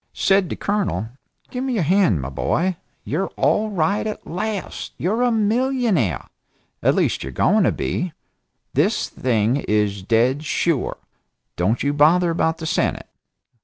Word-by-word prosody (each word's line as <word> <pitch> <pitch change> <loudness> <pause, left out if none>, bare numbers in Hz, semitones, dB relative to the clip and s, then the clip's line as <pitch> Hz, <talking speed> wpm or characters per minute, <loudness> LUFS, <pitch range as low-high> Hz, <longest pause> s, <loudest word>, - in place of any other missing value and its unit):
Said 195 -2 +2
the - - -3
Colonel: 185 - -1 0.4
"Give 250 0 -3
me 265 -1 -1
your 210 -7 +1
hand, 160 - +3
my 70 - -4
boy! 175 - 0 0.3
You're 185 +7 -1
all 215 +1 +2
right 200 +2 0
at 215 - -6
last! 205 +3 -4
You're 215 +7 0
a 245 -1 +3
millionaire! 220 - +1 0.6
At - - +3
least - - +1
you're 65 - -5
going 195 - +3
to - - +3
be. 180 -1 -2 0.6
The - - +3
thing 115 0 0
is 105 -6 0
dead 120 +8 +2
sure. 155 -1 0 0.6
Don't 95 - 0
you 140 +1 +1
bother 165 +4 +4
about 165 0 0
the 160 - -6
Senate. - - -1
170 Hz, 150 wpm, -21 LUFS, -, 0.6 s, bother